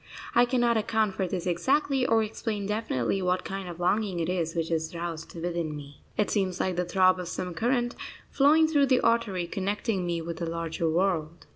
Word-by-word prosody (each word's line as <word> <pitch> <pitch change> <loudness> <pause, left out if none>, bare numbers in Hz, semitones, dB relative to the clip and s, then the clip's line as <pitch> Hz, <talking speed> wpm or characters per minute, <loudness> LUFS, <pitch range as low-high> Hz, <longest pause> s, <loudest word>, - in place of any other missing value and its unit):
I 240 - +6
cannot 240 -2 +2
account 220 -2 +1
for 190 0 -1
this 180 -1 -3
exactly, 260 - +1
or 225 -1 +3
explain 215 -1 -3
definitely 195 - -1
what 180 0 0
kind 195 -1 -5
of 175 0 -8
longing 190 +1 +1
it 165 0 -1
is 170 -2 -1
which 165 0 -1
is 160 +1 -1
roused 165 -1 -5
within 170 -2 -3
me. 145 -1 -10 0.2
It 210 - +1
seems 190 -3 0
like 185 -1 0
the 180 +1 0
throb 185 +1 +3
of 180 - -5
some 180 0 -4
current 240 +6 0 0.4
flowing 305 +3 +5
through 290 -3 +3
the 255 -1 +3
artery 215 -7 +1
connecting 195 +1 -2
me 170 -1 -1
with 165 0 -5
the 170 - -3
larger 165 0 -2
world. 170 -2 0
185 Hz, 195 wpm, -27 LUFS, 170-220 Hz, 0.4 s, I